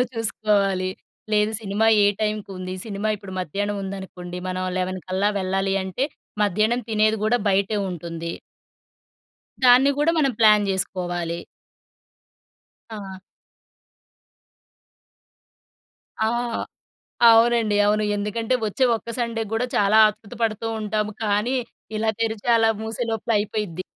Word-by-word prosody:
లేదు 250 - +2
చూసుకోవాలి. 200 -4 0 0.4
లేదు, 210 +1 +2
సినిమా 210 +1 0 0.2
ఏ - - +5 0.2
టైంకుంది, 195 -4 -3
సినిమా 210 -1 -3
ఇప్పుడు 195 -1 -10
మధ్యానముందనుకోండి, 190 -1 -4
మనం 185 0 -2
11 185 0 -2
కల్లా 190 +2 +1
వెళ్ళాలి 195 +1 0
అంటే, 190 +8 -2 0.4
మధ్యానం 215 +4 +2
తినేది 215 0 +3
గూడా 240 +3 +3
బయటే 200 +2 +1
ఉంటుంది. 170 -1 -5 1.3
దాన్ని 255 +3 +7
గూడా 305 +3 +3
మనం 275 -3 +2
ప్లాన్ 210 -2 +5
చేసుకోవాలి. 175 -3 -2 1.6
ఆ! 190 -2 -8 3.0
ఆ! 220 - +2 1.0
అవునండి. 230 -2 +5
అవును. 210 +1 +2
ఎందుకంటే, 220 +4 -1
ఒచ్చే 255 +6 +1
ఒక్క 230 +1 -9
సండే 230 -2 -1
గూడా 235 +3 0
చాలా 205 +2 +4
ఆత్రుత 215 -1 -9
పడుతూ 225 0 0
ఉంటాము, 215 0 -1
కానీ 210 +5 +1 0.4
ఇలా 220 +1 +1
తెరిచి 225 0 -2
అలా 225 0 +4
మూసే 225 +2 -3
లోపల 225 +1 -4
అయిపోయిద్ది. 205 -4 -3
210 Hz, 110 wpm, -23 LUFS, 190-225 Hz, 3.0 s, దాన్ని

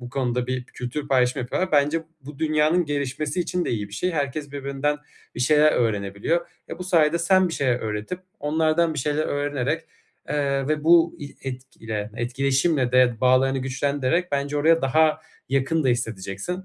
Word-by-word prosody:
bu 125 - -8
konuda 125 -1 -1
bir 130 -1 -3
kültür 125 +5 -6
paylaşımı 130 0 +2
yapıyorlar. 185 +8 -2
Bence 150 +3 +3 0.2
bu 140 +1 -11
dünyanın 155 +2 +2
gelişmesi 145 +2 -2
için 180 0 -1
de - - -2
iyi 105 -3 -2
bir 100 - -19
şey. 180 - -1
Herkes 145 -2 -3
birbirinden 140 +1 -2 0.4
bir - - -5
şeyler 150 +3 +5
öğrenebiliyor. 105 - 0 0.2
E, - - -7
bu 180 - -5
sayede 170 -2 +3
sen 185 +1 +3
bir - - -6
şeyler 125 -3 0
öğretip 110 +11 -4 0.2
onlardan 160 +2 +1
bir - - -3
şeyler 150 +3 0
öğrenerek, 145 +2 -1 0.5
eee, 140 -1 0
ve 155 0 -1
bu 170 0 +5
i 140 -1 -9
etkile 115 -5 -6
etkileşimle 135 +2 +1
de 125 -2 +4
bağlarını 130 +1 +3
güçlendirerek 140 +5 -1
bence 140 +1 -1
oraya 165 +2 +3
daha 155 +3 +3 0.3
yakın 135 +3 +1
da - - +3
hissedeceksin. 115 - -3
140 Hz, 165 wpm, -24 LUFS, 125-155 Hz, 0.5 s, şeyler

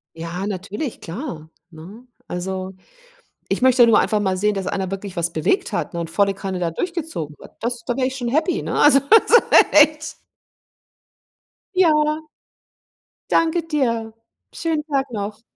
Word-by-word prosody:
Ja, 170 +4 -5
natürlich, 210 - -5
klar, 165 - -7 0.2
ne? 185 +10 -13 0.2
Also, 185 +1 -4 0.8
ich - - -2
möchte 255 -2 +6
nur 225 - +5
einfach 210 -1 0
mal 190 -2 0
sehen, 210 +2 +1
dass 195 -1 -4
einer 190 -1 -2
wirklich 195 -1 -6
was 170 0 -1
bewegt 160 - 0
hat, - - -3
ne? 170 - -3
Und 165 -1 -5
volle 195 +2 +1
Kanne 190 -1 -5
da 170 -2 -1
durchgezogen 300 - -5
hat. - - -15
Das 235 +1 -3
da 245 - -2
wär 255 -1 +1
ich 265 0 -4
schon 245 -2 -3
happy, 315 +8 0
ne? - - -4
Also, 290 -2 +6
so, 445 +11 +4 0.4
echt. 305 +1 +4 1.6
Ja. 310 -3 +2 1.0
Danke 330 +1 +2
dir. 230 -7 -1 0.4
Schönen 320 -2 -2
Tag 275 -4 -2
noch. 210 0 -5
225 Hz, 155 wpm, -21 LUFS, 185-300 Hz, 1.6 s, möchte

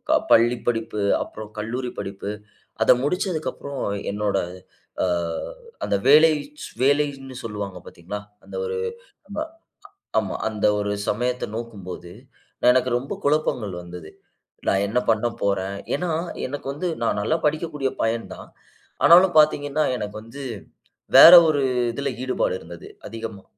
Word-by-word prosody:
அ - - +6
பள்ளி 120 +2 +5
படிப்பு 115 -2 -1 0.2
அப்பறம் 110 0 -10
கல்லூரி 125 +4 -3
படிப்பு 100 +1 -5 0.5
அதை 110 - +7
முடிச்சதுக்கப்புறம் 155 -4 -2 0.3
என்னோட 105 0 -1 0.7
அ - - +3 0.8
அந்த - - 0
வேலைச் 150 0 +4 0.2
வேலைன்னு 140 -1 +1
சொல்லுவாங்க 105 -4 -5
பார்த்தீங்களா, 90 +5 -7 0.3
அந்த - - -10
ஒரு 465 0 -3 0.5
ஆமா, - - -3 0.8
ஆமா. 100 -4 -1
அந்த 105 -2 -1
ஒரு 105 0 -1 0.2
சமயத்த 125 +3 -1
நோக்கும்போது, 95 -7 -7 0.6
எனக்கு 130 0 +2
ரொம்ப 130 +3 -7
குழப்பங்கள் 140 -9 0
வந்தது. 85 -2 -10 0.6
"நான் 95 +1 +2
என்ன 115 +5 +1
பண்ண 110 +1 +2
போறேன்?" 100 0 -1 0.2
ஏன்னா 175 +5 -2 0.4
எனக்கு 140 +1 -6
வந்து 155 +6 -3 0.2
நான் 115 - +1
நல்லா 160 +10 +1
படிக்கக்கூடிய 150 -2 -1
பையன் 115 0 -1
தான். - - -12 0.5
ஆனாலும் 175 +1 +7
பார்த்தீங்கன்னா, 150 0 +2
எனக்கு 105 -3 -5
வந்து 115 +6 -10 0.7
வேற 170 - +12
ஒரு 150 -3 +2 0.3
இதுல 140 +4 -3
ஈடுபாடு 130 0 0
இருந்தது 85 0 -11 0.2
அதிகமா. 110 -3 -7
120 Hz, 125 wpm, -23 LUFS, 105-145 Hz, 0.8 s, வேற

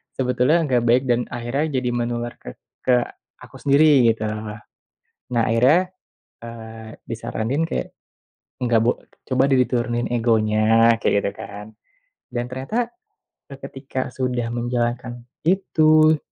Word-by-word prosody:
sebetulnya 130 +5 +2
gak 125 -5 +1
baik 125 +3 +4
dan 120 0 +1
akhirnya 120 +5 -2 0.2
jadi 125 - -1
menular 120 0 -2
ke - - -9 0.3
ke 125 - +2 0.5
aku - - -14
sendiri 140 -3 +5
gitu. 110 - -7 1.1
Nah, 120 -1 +2
akhirnya, 130 +11 +4 0.6
eee, 110 -1 -9 0.2
disaranin 115 +5 -2
kayak 165 - -3 0.7
nggak 120 -2 +3
bo 120 - +4 0.3
coba 130 0 +1
deh 135 - +4
diturunin 120 -1 0
egonya 115 0 +3
kayak - - +2
gitu 100 - -1
kan, 105 +1 -9 0.7
dan 120 0 -3
ternyata 135 - -2 0.6
seketika 135 -1 -6
sudah 125 -2 -2
menjalankan 120 0 -2 0.2
itu, 155 -4 +4
120 Hz, 120 wpm, -22 LUFS, 115-135 Hz, 1.1 s, sendiri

